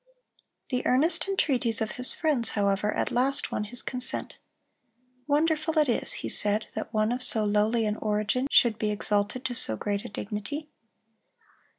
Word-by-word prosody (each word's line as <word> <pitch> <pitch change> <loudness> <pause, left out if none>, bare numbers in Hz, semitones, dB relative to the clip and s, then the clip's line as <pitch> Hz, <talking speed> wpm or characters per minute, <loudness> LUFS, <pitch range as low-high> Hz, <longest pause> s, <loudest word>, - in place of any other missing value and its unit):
The 250 -1 -2
earnest 300 +10 +2
entreaties 260 - 0
of 220 -1 -3
his 250 0 +6
friends, 295 -8 +2
however, 200 +1 0
at - - -3
last 265 +3 0
won 210 - -3
his 240 +3 -1
consent. 250 -1 -1 0.9
"Wonderful 315 +2 0
it 305 -1 +3
is," 240 - 0
he - - -2
said, 210 +1 +3
"that - - -6
one 215 0 0
of 250 +1 -3
so 220 -3 +2
lowly 210 +2 0
an 210 0 -3
origin 215 +5 -2
should 230 -5 +3
be 215 - -1
exalted 210 +4 -2
to 250 - -2
so 110 - +4
great 205 - -4
a - - -9
dignity." 210 +9 -7
230 Hz, 165 wpm, -26 LUFS, 210-260 Hz, 0.9 s, his